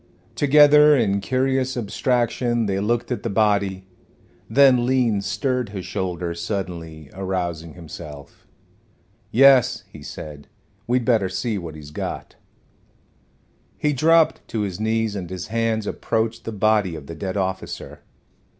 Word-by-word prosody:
Together 150 +1 +6
in 100 -4 +1
curious 130 +2 0
abstraction 120 +1 0
they 95 -1 -1
looked 115 +5 -1
at 125 - -2
the 115 - -3
body. 100 -2 +1 0.6
Then 130 0 +5
Lean 120 -6 +2
stirred 125 +2 -1
his 95 -3 -6
shoulders 90 -3 -3
suddenly, 85 -7 -5
arousing 90 -4 -4
himself. 75 -4 -11 0.8
"Yes," 135 0 +5
he - - -11
said, 75 -2 -9 0.4
"we'd 125 0 +1
better 110 -7 +2
see 100 +3 -2
what 85 -3 -8
he's 75 -1 -11
got." - - -6 1.4
He 150 -1 0
dropped 160 +4 +3
to 110 - -3
his 100 -2 -3
knees, 110 -1 0
and 90 -4 -5
his 90 -1 -6
hands 115 -1 0
approached 115 +1 -2
the 115 - -4
body 105 -4 +1
of 75 -3 -9
the 85 - -8
dead 95 +4 -4
officer. 95 0 -4
105 Hz, 130 wpm, -22 LUFS, 95-125 Hz, 1.4 s, Together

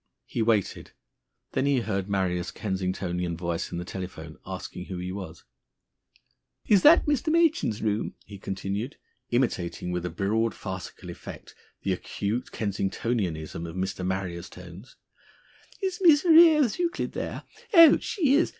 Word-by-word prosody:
He - - -3
waited. 110 -3 0 0.6
Then 135 - 0
he 140 -3 +3
heard 100 -3 -2
Marrier's 90 -3 0
Kensingtonian 90 -3 -2
voice 85 -1 -3
in - - -4
the 90 - -4
telephone, 90 -4 -7
asking 90 - -6
who 95 - -6
he 90 +1 -4
was. 95 -4 -7 1.2
"Is 200 -3 +5
that 320 +3 +7
Mr. 295 +1 +1
Machin's 320 - +2
room?" 105 0 -1
he 100 -1 -11
continued, 100 +6 -4 0.3
imitating 115 -8 -1
with 90 -1 -2
a 90 - -2
broad 105 +6 0
farcical 95 -2 -7
effect - - -10 0.3
the 95 - +1
acute 105 +6 -3
Kensingtonianism 95 -5 -2
of 80 - -8
Mr. 95 0 -3
Marrier's 90 -2 -3
tones. 90 +6 -12 0.9
"Is 375 -1 -1
Miss 320 -3 +6
Ra 340 - +5
ose 315 -7 +6
Euclid 345 -1 -1
there? - - -5 0.3
Oh! 330 -5 +8
She 310 - +1
is? 320 +4 +4
100 Hz, 140 wpm, -27 LUFS, 90-135 Hz, 1.2 s, Oh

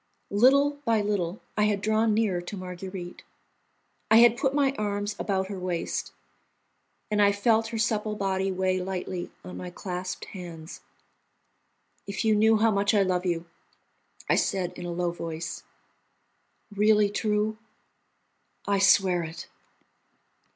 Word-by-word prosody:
Little 280 +7 +4
by 225 -4 +2
little 200 -2 -2
I 210 - +3
had 210 -1 +1
drawn 220 +2 +2
nearer 205 -5 +1
to 185 +3 -7
Marguerite. 180 0 -7 0.9
I 220 - +7
had 235 0 +7
put 270 +2 0
my 280 -2 +3
arms 205 -1 -2
about 190 -2 0
her 195 -1 -6
waist, 180 -2 -3 1.0
and 210 0 +2
I 200 0 +6
felt 220 +2 +2
her 225 0 -5
supple 215 -1 0
body 195 -1 -1
weigh 185 0 0
lightly 180 -1 -4
on 180 - -8
my 180 - -6
clasped 180 +1 -5
hands. 170 -4 -9 1.3
"If 200 +3 -3
you 220 - +4
knew 220 +1 +4
how 225 +1 +3
much 200 +1 +2
I 200 - +5
love 185 -1 0
you!" 170 -1 -1 0.8
I - - +3
said 180 -2 0
in 175 -1 -7
a - - -3
low 175 0 -1
voice. 165 -1 -5 1.1
"Really 210 0 +4
true?" 215 0 0 1.1
"I 200 -1 +1
swear 190 -2 +4
it." 165 +1 -7
200 Hz, 140 wpm, -27 LUFS, 180-215 Hz, 1.3 s, I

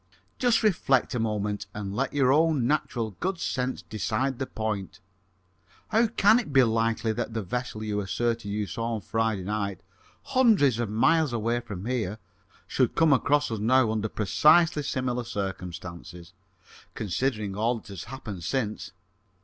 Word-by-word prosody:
"Just 245 -3 +3
reflect 160 - +2
a 120 - -1
moment 105 -2 -2
and 100 -1 -4
let 130 +3 -1
your 135 -2 +3
own 155 -4 +3
natural 120 -5 0
good 190 0 -1
sense 130 -3 -2
decide 120 +4 -2
the 135 - -2
point. 105 -3 -4 0.9
How 225 +2 +3
can 220 +1 +4
it 230 - -5
be 135 -2 +6
likely 115 -1 +1
that 115 0 -4
the 110 - -1
vessel 110 +2 -4
you 105 -1 -2
asserted 115 +2 -1
you 105 +1 -1
saw 115 +3 -3
on 110 - -5
Friday 110 +1 -1
night, 100 -1 -3 0.4
hundreds 220 - +3
of 120 -3 -1
miles 150 +6 +3
away 115 +1 0
from 105 -5 -7
here, 115 -5 -2 0.5
should 130 -3 0
come 160 -3 +5
across 145 +1 +2
us 110 - -2
now 120 +1 +3
under 110 0 -1
precisely 150 - +4
similar 125 -3 -2
circumstances, 90 -5 -6 0.6
considering 105 -1 -2
all 115 +4 +1
that 110 - -13
has 95 -3 -7
happened 105 -9 -7
since?" 110 -4 -3
115 Hz, 155 wpm, -27 LUFS, 105-135 Hz, 0.9 s, be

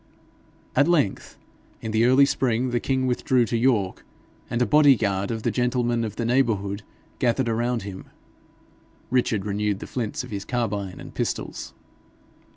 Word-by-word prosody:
At 145 +4 +4
length, 155 - 0 0.4
in 110 - -5
the 110 +2 +3
early 130 +3 +6
spring, 125 -2 0
the 120 - +1
king 130 0 0
withdrew 125 0 +2
to 115 - -2
York, 115 -6 +1 0.5
and 120 - -1
a 125 - +3
body 145 +4 +6
guard 100 -3 -1
of 110 -1 -3
the - - +1
gentlemen 120 -1 0
of 110 -3 -4
the 115 - -2
neighbourhood 110 -5 +1 0.4
gathered 125 +1 +1
around 115 0 0
him. 95 -2 -8 1.1
Richard 115 -6 +1
renewed 105 0 -1
the - - -8
flints 125 +4 -3
of 125 - -10
his 100 -1 -4
carbine 105 -6 -3
and - - -10
pistols. - - -4
120 Hz, 160 wpm, -24 LUFS, 105-125 Hz, 1.1 s, early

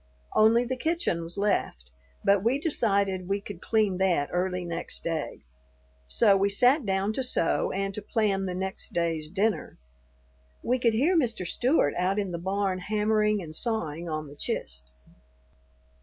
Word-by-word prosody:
Only 230 +3 +5
the 260 +2 -2
kitchen 320 - 0
was 165 +3 -6
left, 65 - -1 0.3
but 200 -1 +3
we 240 +5 +2
decided 200 - 0
we 200 +1 +1
could 200 -3 -9
clean 215 -4 +1
that 175 -7 +2
early 180 0 -1
next 170 -1 -3
day; 160 -3 -3 0.6
so 65 - +4
we 195 +1 +2
sat 250 +5 +3
down 195 +2 0
to 265 - -1
sew 250 -9 +1
and 195 +1 -2
to 210 - -3
plan 200 -2 0
the 180 - -3
next 190 +1 -4
day's 165 -3 -1
dinner. 205 +4 -1 0.9
We 250 +2 +1
could 230 -2 +2
hear 305 +11 +3
Mr. 230 - +1
Stewart 245 - +2
out 185 +2 +1
in 200 -3 -1
the 170 - -4
barn 190 +1 -1
hammering 210 0 +1
and 155 -2 -9
sawing 170 -8 -2
on 155 -1 -3
the 145 - -12
"chist." 65 - -4
195 Hz, 160 wpm, -27 LUFS, 175-220 Hz, 0.9 s, Only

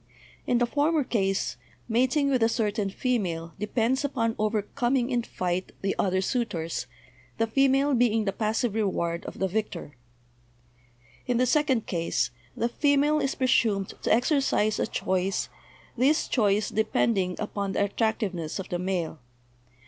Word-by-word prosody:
In 245 - +3
the 245 - +3
former 295 +4 +1
case, 195 - -1 0.3
mating 260 +5 +2
with 255 -3 +2
a 225 - +4
certain 210 -3 0
female 180 -9 -2
depends 230 +5 0
upon 235 -5 0
overcoming 240 +4 0
in 240 -1 +2
fight 185 -4 -3
the 195 - 0
other 185 -1 +2
suitors, 190 -7 -2 0.5
the 225 - +2
female 270 +4 +3
being 230 -3 +2
the 195 - 0
passive 220 +1 0
reward 170 -6 -1
of - - -7
the 190 - 0
victor; 185 -7 -4 1.3
in 245 -1 +1
the 250 - +3
second 265 -3 +2
case 165 -8 -1 0.3
the 235 - +1
female 290 +4 +2
is 275 - -1
presumed 220 -6 +1
to - - 0
exercise 245 -3 +2
a - - +1
choice, 190 +1 -1 0.5
this 270 +5 +2
choice 210 -3 +2
depending 210 -4 +1
upon 200 -2 -3
the 200 - +2
attract 220 +3 0
iveness 170 -6 -3
of 190 - -6
the 175 - -2
male. 175 -4 -2
220 Hz, 145 wpm, -27 LUFS, 195-250 Hz, 1.3 s, a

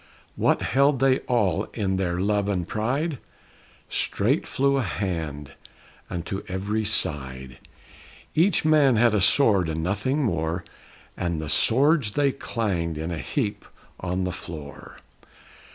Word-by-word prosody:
What - - +2
held 140 +2 +3
they 135 0 +3
all 105 -9 +1
in 95 -4 0
their 90 -2 -1
love 100 +1 +1
and 90 -4 -1
pride? 135 +7 -1 0.7
Straight - - 0
flew 140 +1 +1
a - - +2
hand 80 - -3 0.6
unto 90 +2 -4
every 100 +4 -2
side; 65 - -2 0.7
Each 170 0 +2
man 150 -5 +5
had 115 0 +4
a 105 - +2
sword 100 - +4
and 80 0 -2
nothing 105 - 0
more, 85 -4 -1 0.5
And 85 -2 -2
the 80 -1 -5
swords 135 - +3
they 140 +1 +2
clanged 95 - -2
in 80 +3 -4
a 85 - -3
heap 115 -9 -2 0.4
on 95 +1 -2
the 90 - -1
floor. 75 -5 -9
100 Hz, 135 wpm, -25 LUFS, 85-130 Hz, 0.7 s, man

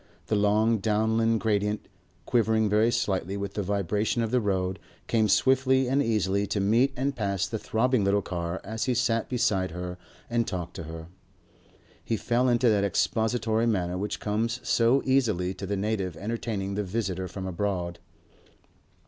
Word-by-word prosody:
The 110 - 0
long 105 +2 +3
Downland 110 +2 +1
gradients, 105 -1 0 0.4
quivering 110 -2 +2
very 105 +3 +3
slightly 95 -4 -1
with 100 0 -4
the 105 - -2
vibration 100 +4 0
of 110 - -2
the 125 -1 +2
road, 95 -2 -1 0.3
came 110 -2 +2
swiftly 130 +4 +3
and 135 +3 +2
easily 100 -4 +1
to 105 - -1
meet 115 +7 +3
and 135 +2 -1
pass 100 -3 -1
the 110 +2 -4
throbbing 120 +1 +1
little 100 0 +2
car 85 0 -3
as 110 +3 -3
he 130 -2 +1
sat 115 -2 +1
beside 95 -7 +1
her 90 +1 -6 0.3
and 120 0 0
talked 90 -2 -4
to 85 - -6
her. 80 0 -7 1.0
He 115 - -1
fell 120 +4 +1
into 120 +1 +3
that 105 -2 +2
expository 110 +2 +1
manner 90 -5 0
which 105 +2 -3
comes 115 +3 -1
so 120 +4 +3
easily 110 -9 +1
to 95 - -7
the 100 +1 -1
native 95 -4 -2
entertaining 105 -1 -3
the 105 +1 -1
visitor 95 -2 -2
from 95 +1 -6
abroad. 90 -2 -2
105 Hz, 165 wpm, -27 LUFS, 95-115 Hz, 1.0 s, long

